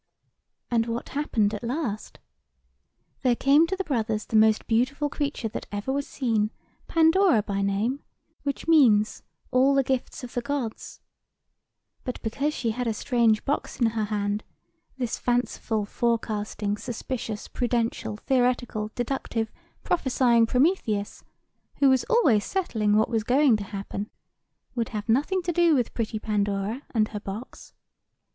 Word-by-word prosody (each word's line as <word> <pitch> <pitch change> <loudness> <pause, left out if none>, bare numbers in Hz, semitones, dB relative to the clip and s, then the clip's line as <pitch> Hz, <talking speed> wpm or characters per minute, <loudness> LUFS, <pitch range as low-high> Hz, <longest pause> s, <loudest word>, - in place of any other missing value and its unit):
"And 230 -1 +2
what 230 +1 -4
happened 225 -7 0
at 210 - -5
last? 235 -4 -3 1.0
There 250 -2 +3
came 285 +6 +4
to 380 - -1
the 385 - -2
two - - -26
brothers 225 -6 -1
the - - -4
most 220 0 +4
beautiful 255 +6 +1
creature 285 -5 -2
that - - -6
ever 205 +6 -2
was 280 0 -2
seen, 225 -5 0 0.4
Pandora 325 - +4
by 200 -1 -2
name; 205 +8 0 0.4
which 280 +1 -4
means, 225 -10 +4 0.3
All 265 +2 +4
the 275 - +4
gifts 260 0 -2
of 245 - -8
the 245 - -1
Gods. 270 -4 -4 1.0
But 250 - -4
because 275 +7 -1
she 235 -6 -1
had 245 +2 -3
a 225 - 0
strange 230 -2 +2
box 285 - -2
in 235 -3 +3
her 220 -1 -1
hand, 205 0 -1 0.5
this 245 -3 -2
fanciful, 240 -3 0
forecasting, 210 -2 -1
suspicious, 225 -1 -5
prudential, 230 -3 -1
theoretical, 245 -3 0
deductive, 240 -3 -2 0.3
prophesying 245 -7 +3
Prometheus, 250 - 0 0.5
who 275 - +4
was 260 -2 +2
always 265 - +3
settling 220 - 0
what 220 - +3
was 225 -2 0
going 260 +1 +4
to 205 - -6
happen, 200 +1 -5 0.6
would 235 -3 -2
have 210 - -5
nothing 295 +11 +1
to 345 - 0
do 340 -2 +4
with 245 -4 0
pretty 225 -2 -2
Pandora 205 +2 -1
and 215 -3 +1
her 210 - -5
box. 205 +4 -8
235 Hz, 145 wpm, -26 LUFS, 215-270 Hz, 1.0 s, came